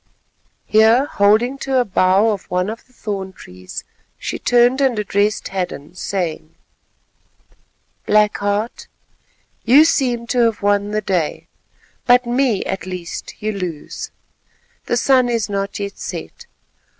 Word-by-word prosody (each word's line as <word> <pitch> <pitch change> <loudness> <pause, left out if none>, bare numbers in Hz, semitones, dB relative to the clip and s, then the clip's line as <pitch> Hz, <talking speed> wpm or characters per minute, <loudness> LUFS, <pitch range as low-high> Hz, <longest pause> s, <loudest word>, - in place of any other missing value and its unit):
Here, 220 +5 +5
holding 230 +4 +2
to 270 -1 -1
a 250 - +3
bough 190 +2 +3
of 200 -3 -5
one 180 +3 0
of 225 - -10
the - - -28
thorn 195 -5 -5
trees, 90 - -9 0.3
she - - -4
turned 245 +2 +3
and 260 -4 +2
addressed 205 0 0
Hadden, 175 -5 -4
saying:— 175 -4 -4 1.5
"Black 210 0 +3
Heart, 205 +3 -2 0.8
you 275 +7 +7
seem 245 -7 +1
to 245 +1 -1
have 225 -3 -1
won 205 0 +2
the 215 0 -1
day, 180 -6 -1 0.6
but 245 0 +5
me 240 -3 +1
at 190 -1 -4
least 180 -2 -6
you 215 - 0
lose 180 -7 -5 0.7
and—the 240 - -2
sun 255 0 +3
is 230 -3 -1
not 200 0 -3
yet 200 0 -5
set. 475 - -7
210 Hz, 135 wpm, -19 LUFS, 190-240 Hz, 1.5 s, you